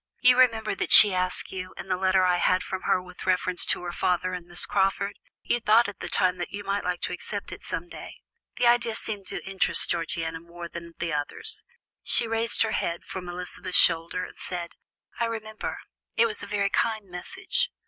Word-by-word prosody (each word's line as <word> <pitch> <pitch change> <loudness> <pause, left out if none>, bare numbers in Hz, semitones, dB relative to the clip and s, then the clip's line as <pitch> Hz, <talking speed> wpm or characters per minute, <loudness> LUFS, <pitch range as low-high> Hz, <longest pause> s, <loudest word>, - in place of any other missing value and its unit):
You 250 0 +6
remember 225 -4 +3
that - - -3
she 205 -3 +9
asked 180 0 +2
you, 185 -1 -7
in - - -8
the 185 - +1
letter 185 0 +2
I 180 -1 +3
had 185 +1 +2
from 190 0 -5
her - - +3
with 180 0 -11
reference 185 -1 +1
to - - 0
her 175 - -4
father 180 +1 0
and 180 -1 -6
Miss 175 0 0
Crawford. 200 0 0 0.2
You 240 - 0
thought 225 0 +4
at 205 -2 -8
the - - -5
time 185 0 +3
that 175 - -3
you 205 +1 -6
might 200 0 -2
like 180 -1 -2
to - - -2
accept 200 +3 -5
it - - -8
some 170 +2 -4
day." - - -10 0.4
The 245 - +1
idea 235 -1 +3
seemed 205 -4 -3
to - - -4
interest 195 -1 +1
Georgiana 165 -1 -2
more 170 +1 -9
than 170 0 -10
the 170 -2 -3
others. 290 - 0 0.4
She 235 - +2
raised 225 +1 +2
her 225 - -1
head 170 -4 -2
from 180 -1 -7
Elizabeth's 180 +1 -3
shoulder, 170 +2 +4
and - - -12
said: 175 -2 -3 0.5
"I 235 - +2
remember; 220 -1 -5 0.4
it 230 - +5
was 220 -2 -1
a 205 - -7
very 200 -1 0
kind 220 -2 0
message. 185 - -2
185 Hz, 210 wpm, -26 LUFS, 175-215 Hz, 0.5 s, she